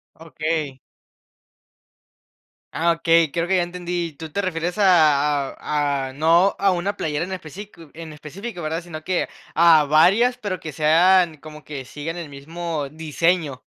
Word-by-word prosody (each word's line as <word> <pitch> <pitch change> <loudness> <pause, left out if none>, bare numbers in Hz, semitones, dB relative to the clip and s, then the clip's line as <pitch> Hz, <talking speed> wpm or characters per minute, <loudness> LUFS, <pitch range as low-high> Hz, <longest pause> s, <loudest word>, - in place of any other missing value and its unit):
Okey. 155 -3 -4 2.0
Ah, 170 +1 +2
okey, 165 -2 +2
creo 170 +1 -1
que 190 - +2
ya 175 - +2
entendí. 175 -1 -4
¿Tú 160 +2 -9
te 200 - -2
refieres 175 +1 -3
a 150 -7 +3
a 145 -3 -2
a - - -12
no 165 +7 +3
a 195 -1 +2
una 185 +3 -2
playera 150 -2 -2
en 190 - -7
especifico 175 -2 -9
en 160 -1 -9
específico, 175 +6 -8
verdad? 160 +2 -2
Sino 170 -3 -9
que 185 +2 -1 0.3
a 165 -2 +6
varias, 195 - +4
pero 205 -6 -4
que 155 - -6
sean, 165 +2 +3
como 150 0 -12
que 140 -3 -7
sigan 150 +6 -6
el 170 -3 -6
mismo 155 +1 -5
diseño. 160 -1 -1
165 Hz, 150 wpm, -22 LUFS, 150-175 Hz, 2.0 s, a